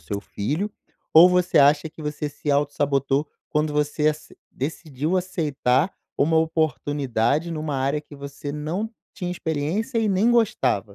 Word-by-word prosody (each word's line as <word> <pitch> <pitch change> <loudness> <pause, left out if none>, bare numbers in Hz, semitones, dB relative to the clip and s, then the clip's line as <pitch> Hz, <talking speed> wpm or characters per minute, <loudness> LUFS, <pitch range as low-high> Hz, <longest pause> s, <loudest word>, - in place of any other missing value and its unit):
seu 100 +7 -4
filho 150 - -3 0.4
ou 170 +3 +10
você 180 0 +2
acha 145 +2 +4
que 160 - -14
você 150 0 -3
se 145 +1 -4
autossabotou 145 0 +1 0.2
quando 150 0 0
você 150 +1 +1
ace 155 0 -5
decidiu 150 +3 -3
aceitar 160 -4 0 0.2
uma 160 +3 +3
oportunidade 150 -3 0
numa 155 -3 -3
área 140 +3 0
que 150 -1 -14
você 140 +1 -7
não 155 +9 -3 0.3
tinha 180 -3 -4
experiência 180 - -2
e 220 -2 +1
nem 200 +5 +3
gostava? 225 - +2
150 Hz, 145 wpm, -23 LUFS, 145-170 Hz, 0.4 s, ou